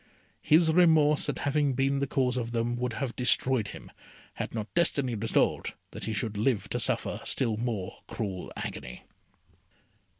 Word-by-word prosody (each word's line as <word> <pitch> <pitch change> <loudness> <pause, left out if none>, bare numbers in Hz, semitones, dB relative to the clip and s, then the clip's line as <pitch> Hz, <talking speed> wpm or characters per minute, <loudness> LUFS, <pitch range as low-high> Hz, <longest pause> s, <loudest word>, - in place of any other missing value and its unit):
His 160 +1 +4
remorse 155 -4 +4
at - - -2
having 145 -1 +1
been 135 +2 +1
the 140 - -1
cause 130 -2 0
of 120 -2 -3
them 120 +1 0
would 125 -1 -2
have 130 0 -3
destroyed 125 -2 +3
him, - - -10 0.4
had - - -5
not 110 -1 -5
Destiny 140 -7 +1
resolved 110 0 0 0.2
that - - -6
he 110 - -2
should 110 0 -2
live 110 0 +1
to - - -1
suffer - - +1
still 115 -5 +1
more 110 -5 -4
cruel 95 -5 -5
agony. 60 0 -7
125 Hz, 160 wpm, -28 LUFS, 110-140 Hz, 0.4 s, His